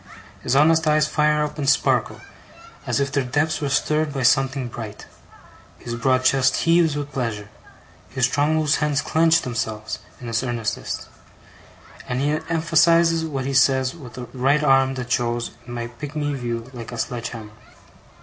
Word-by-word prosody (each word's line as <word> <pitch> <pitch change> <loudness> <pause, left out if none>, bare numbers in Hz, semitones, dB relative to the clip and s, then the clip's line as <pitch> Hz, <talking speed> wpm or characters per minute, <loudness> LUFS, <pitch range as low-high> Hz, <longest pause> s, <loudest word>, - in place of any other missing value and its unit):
His 125 - 0
honest 160 +3 +4
eyes 150 0 +4
fire 150 0 +2
up, 150 +1 -5
and 140 -1 +1
sparkle, - - +1 0.7
as - - 0
if 140 0 -1
their 140 0 0
depths 145 +6 -1
were 145 - -1
stirred 150 +2 +1
by 135 -2 -3
something 130 0 +2
bright. 110 -3 -8 0.7
His 120 - -7
broad 130 +2 +1
chest 130 0 +3
heaves 165 -2 +3
with 145 0 -4
pleasure. 115 -6 -3 0.6
His 130 -1 +1
strong 145 +4 +1
loose 155 -1 +2
hands 150 -2 0
clench 165 +1 +3
themselves, 110 -3 -4 0.2
in 125 - -10
his 115 -1 -1
earnestness; 120 -3 -3 1.0
and 125 0 -1
he 145 +2 +1 0.2
emphasizes 165 0 +3
what 135 -5 -4
he 140 - -2
says 130 0 +3
with 130 -7 -12
a 125 - -5
right 140 +4 +2
arm 135 -1 +3
that 125 -1 -6
shows, 120 -1 0 0.2
in 120 - -7
my 120 -1 -3
pigmy 145 +4 -4
view, 120 -2 -4
like 120 -2 -8
a 120 - -6
sledge 120 0 -3
hammer. 110 -3 -9
135 Hz, 170 wpm, -22 LUFS, 120-150 Hz, 1.0 s, honest